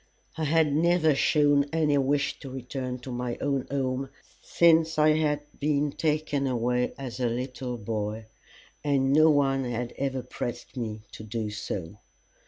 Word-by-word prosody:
I 160 Hz, -, -2 dB
had 155 Hz, -1 st, +3 dB
never 165 Hz, -1 st, +3 dB
shown 145 Hz, 0 st, +3 dB
any 155 Hz, -3 st, +2 dB
wish 140 Hz, +1 st, 0 dB
to 135 Hz, -, -8 dB
return 130 Hz, 0 st, -5 dB
to 130 Hz, -, -7 dB
my 120 Hz, -1 st, -3 dB
own 140 Hz, -2 st, -1 dB
home 135 Hz, -1 st, -1 dB, 0.3 s
since 165 Hz, -1 st, +3 dB
I 155 Hz, 0 st, +5 dB
had 155 Hz, -1 st, +2 dB, 0.2 s
been 145 Hz, 0 st, +1 dB
taken 150 Hz, -2 st, 0 dB
away 125 Hz, 0 st, 0 dB
as 130 Hz, -2 st, -6 dB
a 125 Hz, -2 st, +1 dB
little 125 Hz, +1 st, -4 dB
boy, 110 Hz, 0 st, -3 dB, 0.6 s
and 140 Hz, -2 st, +2 dB
no 155 Hz, +2 st, +6 dB
one 135 Hz, -2 st, +2 dB
had 120 Hz, -1 st, -3 dB
ever 135 Hz, -2 st, -1 dB
pressed 120 Hz, +2 st, -6 dB
me 110 Hz, -4 st, -4 dB
to -, -, -9 dB
do 110 Hz, 0 st, -3 dB
so. 100 Hz, -2 st, -5 dB
135 Hz, 155 wpm, -27 LUFS, 120-150 Hz, 0.6 s, no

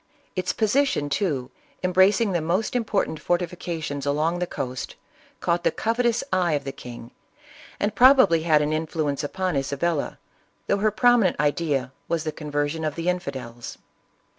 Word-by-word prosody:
Its 185 Hz, -1 st, 0 dB
position 225 Hz, -, +1 dB
too, 140 Hz, -11 st, -1 dB, 0.3 s
embracing 190 Hz, +4 st, +4 dB
the 175 Hz, -3 st, 0 dB
most 185 Hz, +9 st, -1 dB
important 205 Hz, -9 st, -1 dB
fortifica 175 Hz, -2 st, -2 dB
tions 145 Hz, -2 st, -4 dB
along 155 Hz, +5 st, 0 dB
the 180 Hz, -, -1 dB
coast, 130 Hz, -6 st, -5 dB, 0.5 s
caught 170 Hz, 0 st, 0 dB
the -, -, +4 dB
covetous 235 Hz, +1 st, 0 dB
eye 180 Hz, -3 st, +2 dB
of 145 Hz, -1 st, -1 dB
the 135 Hz, -, -4 dB
king, 120 Hz, -3 st, -10 dB, 0.7 s
and 205 Hz, +1 st, 0 dB
probably 250 Hz, -, +6 dB
had 155 Hz, -2 st, +3 dB
an 150 Hz, +1 st, 0 dB
influence 155 Hz, -2 st, -1 dB
upon 185 Hz, +3 st, -2 dB
Isabella, 140 Hz, +3 st, -1 dB, 0.5 s
though 200 Hz, -, +1 dB
her 215 Hz, +2 st, +3 dB
prominent 230 Hz, -3 st, +3 dB
idea 145 Hz, -3 st, 0 dB, 0.2 s
was 165 Hz, -2 st, -1 dB
the 155 Hz, -, -2 dB
conversion 150 Hz, +1 st, -2 dB
of 155 Hz, -2 st, -2 dB
the 170 Hz, +1 st, -1 dB
infidels. 130 Hz, -9 st, -5 dB
170 Hz, 150 wpm, -24 LUFS, 145-190 Hz, 0.7 s, probably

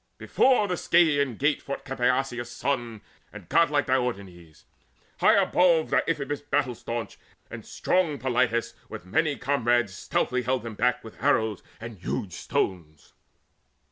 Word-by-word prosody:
Before 255 Hz, -6 st, +2 dB
the 180 Hz, -2 st, -2 dB
Scaean 145 Hz, -9 st, +2 dB
gate 145 Hz, +1 st, +1 dB
fought 140 Hz, -, -6 dB
Capaneus' 125 Hz, -1 st, -1 dB
son 120 Hz, -4 st, -3 dB, 0.3 s
And 105 Hz, -5 st, -12 dB
godlike 150 Hz, -4 st, +3 dB
Diomedes. 100 Hz, -11 st, -3 dB, 0.5 s
High -, -, +5 dB
above 170 Hz, -3 st, +3 dB
Deiphobus 145 Hz, -3 st, 0 dB
battle 145 Hz, -3 st, 0 dB
staunch 115 Hz, 0 st, -6 dB, 0.3 s
and -, -, -8 dB
strong 170 Hz, -6 st, 0 dB
Polites 120 Hz, -2 st, 0 dB, 0.2 s
With 110 Hz, -5 st, -8 dB
many 145 Hz, -, 0 dB
comrades, 120 Hz, -7 st, +1 dB
stoutly 125 Hz, +6 st, -1 dB
held 125 Hz, +1 st, -1 dB
them 115 Hz, -1 st, -6 dB
back -, -, 0 dB
With -, -, -13 dB
arrows 110 Hz, -3 st, +1 dB, 0.2 s
and 115 Hz, -3 st, -9 dB
huge 90 Hz, +1 st, -4 dB
stones. 80 Hz, -5 st, -3 dB
125 Hz, 130 wpm, -26 LUFS, 110-145 Hz, 0.5 s, High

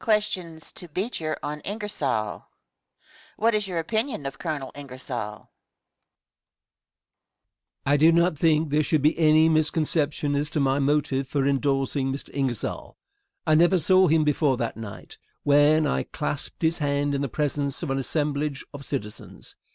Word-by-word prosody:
BEECHER 180 Hz, -4 st, -2 dB
ON 150 Hz, +1 st, -4 dB
INGERSOLL. 155 Hz, -, -3 dB
Question. -, -, -30 dB, 0.9 s
What 230 Hz, +2 st, +2 dB
is 210 Hz, -2 st, 0 dB
your 180 Hz, -3 st, -4 dB
opinion 220 Hz, -, -2 dB
of 135 Hz, -2 st, -5 dB
Colonel 150 Hz, -6 st, -4 dB
Ingersoll? 135 Hz, -2 st, -7 dB, 0.2 s
Answer. 100 Hz, -, -21 dB, 2.4 s
I 145 Hz, +1 st, +3 dB
do 160 Hz, +3 st, +6 dB
not 170 Hz, 0 st, +3 dB
think 155 Hz, -1 st, +2 dB
there 150 Hz, +1 st, +3 dB
should 150 Hz, -1 st, +1 dB
be 150 Hz, -, +4 dB
any 155 Hz, 0 st, +5 dB
misconception 155 Hz, -2 st, +1 dB
as 145 Hz, +1 st, 0 dB
to 150 Hz, -, -2 dB
my 135 Hz, 0 st, +2 dB
motive 140 Hz, -1 st, +1 dB
for 135 Hz, 0 st, 0 dB
indorsing 135 Hz, -1 st, 0 dB
Mr. 135 Hz, -, -6 dB
Ingersoll. 130 Hz, -5 st, -3 dB, 0.5 s
I 155 Hz, -, +3 dB
never 175 Hz, +4 st, +5 dB
saw 185 Hz, +3 st, +5 dB
him 160 Hz, 0 st, +3 dB
before 150 Hz, -3 st, +2 dB
that 120 Hz, -2 st, -3 dB
night, 110 Hz, -3 st, -10 dB, 0.2 s
when 145 Hz, +2 st, +4 dB
I 145 Hz, -, 0 dB
clasped 150 Hz, +1 st, -4 dB
his 160 Hz, +1 st, +1 dB
hand 145 Hz, -1 st, 0 dB
in 140 Hz, -, -1 dB
the 140 Hz, -, -2 dB
presence 145 Hz, +1 st, -2 dB
of 150 Hz, -, -2 dB
an 135 Hz, -, 0 dB
assemblage 145 Hz, 0 st, -2 dB
of 140 Hz, -1 st, -8 dB
citizens. 110 Hz, -7 st, -7 dB
150 Hz, 150 wpm, -25 LUFS, 140-160 Hz, 2.4 s, do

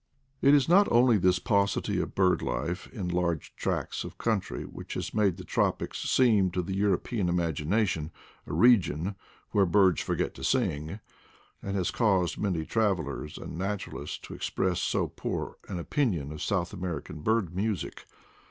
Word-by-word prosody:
It 140 Hz, +1 st, +6 dB
is 140 Hz, -, +3 dB
not 195 Hz, +4 st, +5 dB
only 120 Hz, -1 st, +5 dB
this 90 Hz, 0 st, +3 dB
paucity 100 Hz, -1 st, +1 dB
of -, -, -5 dB
bird 95 Hz, -1 st, +3 dB
life 90 Hz, +3 st, -3 dB
in 100 Hz, -7 st, -4 dB
large 85 Hz, -3 st, -1 dB
tracts -, -, -2 dB
of -, -, -9 dB
country 110 Hz, -5 st, -1 dB
which -, -, -8 dB
has -, -, -4 dB
made 100 Hz, -5 st, +2 dB
the 90 Hz, -, -8 dB
tropics -, -, -1 dB
seem 110 Hz, -7 st, +4 dB
to 90 Hz, -, 0 dB
the 95 Hz, -, -4 dB
European 100 Hz, 0 st, 0 dB
imagination 85 Hz, +1 st, 0 dB, 0.4 s
a -, -, -5 dB
region 100 Hz, -6 st, +4 dB, 0.4 s
"where 100 Hz, -2 st, +3 dB
birds 95 Hz, -1 st, +4 dB
forget -, -, -1 dB
to -, -, -12 dB
sing/' 75 Hz, +7 st, 0 dB, 0.6 s
and 100 Hz, 0 st, -4 dB
has 95 Hz, -1 st, 0 dB
caused 95 Hz, -7 st, +1 dB
many 90 Hz, -6 st, -1 dB
trav 105 Hz, -2 st, +2 dB
elers 75 Hz, -1 st, -6 dB
and 80 Hz, -, -7 dB
naturalists 100 Hz, +1 st, -4 dB
to -, -, -10 dB
express 90 Hz, -2 st, -1 dB
so -, -, 0 dB
poor -, -, -4 dB
an 90 Hz, -, -3 dB
opinion 85 Hz, -, -1 dB
of 75 Hz, 0 st, -7 dB
South 90 Hz, -2 st, -1 dB
American 90 Hz, -4 st, -5 dB
bird 105 Hz, -3 st, 0 dB
music. 100 Hz, -3 st, -3 dB
95 Hz, 160 wpm, -28 LUFS, 85-105 Hz, 0.6 s, It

